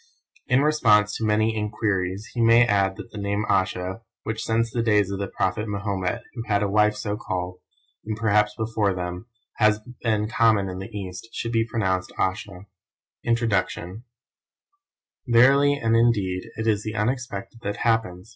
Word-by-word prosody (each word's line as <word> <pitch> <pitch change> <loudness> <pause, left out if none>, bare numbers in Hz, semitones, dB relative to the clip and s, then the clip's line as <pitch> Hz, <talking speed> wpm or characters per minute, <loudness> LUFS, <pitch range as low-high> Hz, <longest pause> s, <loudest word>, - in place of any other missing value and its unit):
In 125 +2 +3
response 110 -9 +3
to - - -5
many 110 +1 +2
enquiries 105 -2 -1
he 120 - -1
may 115 +1 +6
add 100 -3 +1
that - - -10
the 105 - -7
name 100 +1 -1
Ayesha, 95 +2 0 0.2
which 110 0 -3
since 115 0 0
the 120 - -1
days 105 -4 +2
of 100 - -3
the 100 - -2
prophet 95 +4 -1
Mahomet, 100 -3 -2
who 120 - -5
had 105 -1 +1
a - - +1
wife 105 0 +3
so 105 -1 -3
called, 90 -4 -4 0.4
and 110 0 -4
perhaps 105 -1 +2
before 110 -3 0
them, 90 +4 -5 0.3
has 110 -1 +4 0.2
been 110 -2 +1
common 110 -4 +2
in 90 0 -6
the 95 - -7
East, 95 0 -7
should 115 - -3
be 115 -1 +1
pronounced 95 -5 -1
Assha. 95 0 -2 0.6
INTRODUCTION 105 -3 -1 1.2
Verily 135 +4 +5
and 115 -5 +1
indeed 100 -6 +1
it 110 - -4
is 105 -2 +2
the 110 +1 -5
unexpected 115 -1 -3
that 100 -2 -3
happens! 110 -4 0
105 Hz, 165 wpm, -24 LUFS, 95-115 Hz, 1.2 s, may